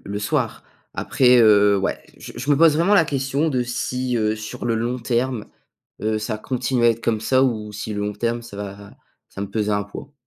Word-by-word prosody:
le 100 +1 -4
soir. 105 - -2 0.3
Après, 125 -1 +3
heu, 105 -3 +5
ouais, 95 - -2 0.2
je - - -10
je 145 - -4
me 145 - +5
pose 160 -1 +5
vraiment 175 +6 +3
la 195 - +5
question 140 +2 -1
de 130 -4 0
si, 125 +1 -2
heu, 110 -1 +1
sur 110 +1 -7
le 115 -1 +1
long 120 +3 -1
terme, 120 -1 -1 0.6
heu, 110 0 0
ça 110 0 -3
continue 125 +1 -1
à - - +7
être 115 0 -2
comme 110 -2 0
ça, 130 +3 +2
ou 110 -5 -1
si 105 +1 -5
le 105 -1 -3
long 105 0 -2
terme, 120 +2 -2
ça 100 - -11
va 100 -1 -6 0.5
ça 100 - -8
va 100 - -3
me - - -20
peser 105 -1 -1
un 100 0 +1
poids? 115 +8 -10
115 Hz, 230 wpm, -22 LUFS, 105-130 Hz, 0.6 s, à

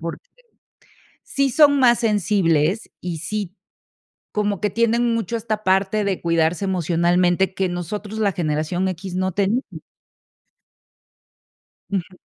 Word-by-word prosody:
porque, 170 - -7 1.0
sí 275 -1 0
son 285 +1 +5
más 240 -2 +5
sensibles 200 -5 +1
y 175 -2 -4
sí, 195 +4 -5 0.8
como 205 -2 0
que 210 - 0
tienen 235 +2 +1
mucho 230 0 -2
esta 215 -1 -3
parte 195 +2 +2
de 195 -2 -2
cuidarse 165 +2 +1
emocionalmente 175 +1 +1
que 190 -1 -1
nosotros, 205 +5 -5
la 200 -3 +1
generación 165 +3 -1
equis, 185 +1 -6
no 185 0 0
tenemos. 205 +7 0 2.3
Ujú. 185 -1 -3
190 Hz, 115 wpm, -21 LUFS, 175-215 Hz, 2.3 s, son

